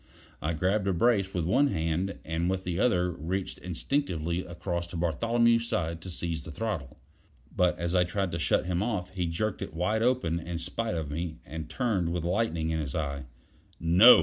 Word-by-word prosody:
I 80 Hz, +2 st, 0 dB
grabbed 95 Hz, +5 st, +1 dB
a 95 Hz, -, +3 dB
brace 100 Hz, 0 st, +3 dB
with 90 Hz, -4 st, -1 dB
one 130 Hz, +11 st, +4 dB
hand, 85 Hz, -, -1 dB
and 80 Hz, +2 st, 0 dB
with 95 Hz, 0 st, -1 dB
the 90 Hz, -2 st, -2 dB
other 90 Hz, -7 st, +3 dB
reached 90 Hz, +5 st, -3 dB
instinctively 90 Hz, -, -1 dB
across 85 Hz, 0 st, -3 dB
to 85 Hz, -, -6 dB
Bartholomew's 115 Hz, +8 st, +3 dB
side 85 Hz, -3 st, -1 dB
to 95 Hz, -, -7 dB
seize 85 Hz, -2 st, -3 dB
the 75 Hz, -, -9 dB
throttle. 80 Hz, -, -3 dB, 0.6 s
But 90 Hz, -1 st, +3 dB
as 85 Hz, 0 st, -2 dB
I 90 Hz, -1 st, +5 dB
tried 95 Hz, +1 st, -1 dB
to 85 Hz, -, -2 dB
shut 80 Hz, -, +2 dB
him 90 Hz, 0 st, 0 dB
off, 105 Hz, -5 st, -1 dB
he 90 Hz, -2 st, -1 dB
jerked 100 Hz, +6 st, -1 dB
it 80 Hz, -, -5 dB
wide 105 Hz, +6 st, +1 dB
open 115 Hz, -9 st, +2 dB
in 85 Hz, 0 st, -4 dB
spite 90 Hz, +6 st, -2 dB
of 80 Hz, -3 st, -3 dB
me, 80 Hz, +1 st, -3 dB
and 80 Hz, +3 st, -6 dB
turned 95 Hz, -2 st, 0 dB
with 85 Hz, -2 st, -1 dB
lightning 85 Hz, -4 st, 0 dB
in 80 Hz, -, 0 dB
his 70 Hz, -4 st, -3 dB
eye. 70 Hz, -3 st, -2 dB, 0.5 s
"No!" 90 Hz, +9 st, +8 dB
90 Hz, 195 wpm, -29 LUFS, 80-100 Hz, 0.6 s, No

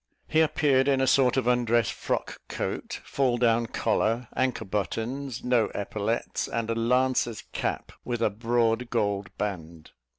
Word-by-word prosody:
He 160 Hz, 0 st, +3 dB
appeared 145 Hz, -4 st, +3 dB
in 135 Hz, -2 st, +3 dB
a 135 Hz, -, +3 dB
sort 130 Hz, -1 st, +4 dB
of 130 Hz, -, +1 dB
undress 120 Hz, -2 st, +2 dB
frock -, -, -3 dB
coat, -, -, -4 dB
fall 130 Hz, -3 st, 0 dB
down 115 Hz, -1 st, +2 dB
collar, 115 Hz, +1 st, 0 dB
anchor 130 Hz, -3 st, 0 dB
buttons, 115 Hz, +6 st, -3 dB
no 125 Hz, -3 st, +3 dB
epaulettes, 105 Hz, +3 st, -2 dB
and 115 Hz, -1 st, -2 dB
a -, -, +2 dB
lancer's 120 Hz, 0 st, +1 dB
cap, -, -, -3 dB
with 120 Hz, -2 st, -2 dB
a 105 Hz, -, +2 dB
broad 115 Hz, +2 st, 0 dB
gold 100 Hz, -5 st, 0 dB
band. 85 Hz, -6 st, -5 dB
120 Hz, 145 wpm, -27 LUFS, 110-125 Hz, -, sort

